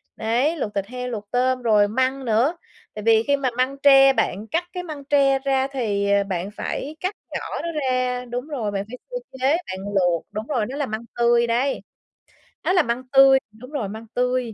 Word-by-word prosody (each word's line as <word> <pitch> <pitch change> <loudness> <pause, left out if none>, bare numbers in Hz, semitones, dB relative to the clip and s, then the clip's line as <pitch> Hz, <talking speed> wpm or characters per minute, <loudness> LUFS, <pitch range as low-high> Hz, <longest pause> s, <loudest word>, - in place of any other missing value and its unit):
Đấy, 240 +8 +1
luộc 210 -7 -3
thịt 200 -1 -1
heo, 250 +1 -5
luộc 210 -4 -6
tôm 255 +1 +1
rồi 210 -3 +4
măng 260 +4 -1
nữa. 245 +9 +2 0.4
Tại 210 - -7
vì 225 0 +4
khi 285 +2 +2
mà 270 -2 0
măng 260 +2 0
tre 270 -1 +7
bạn 210 -3 -1
cắt 335 +2 +1
cái 360 - -4
măng 305 -5 -7
tre 275 -1 +3
ra 270 -1 +1
thì 205 -6 -1 0.2
bạn 185 +1 -3
phải 290 +7 -5
cắt 370 +3 -2 0.2
nhỏ - - -2 0.2
nó - - -3
ra 255 -1 0
đúng 245 +3 -5
rồi, 245 -9 -3
bạn 200 -1 -2
phải 250 +3 -8
sơ - - -2 0.2
chế, 270 +5 +3
bạn 190 - -7 0.2
luộc 175 -3 +2
đúng 215 +2 -5
rồi, 240 -8 0
nó 260 - -6
là 290 - 0
măng 220 0 -5
tươi 235 0 +3
đấy. 245 +4 0 0.8
Đó 365 - +1
là 360 - +4
măng 235 0 -2
tươi 270 0 +7
đúng 250 +5 -13
rồi, 255 -10 -3
măng 220 +3 -8
tươi. 250 -2 0
250 Hz, 210 wpm, -23 LUFS, 220-275 Hz, 0.8 s, tre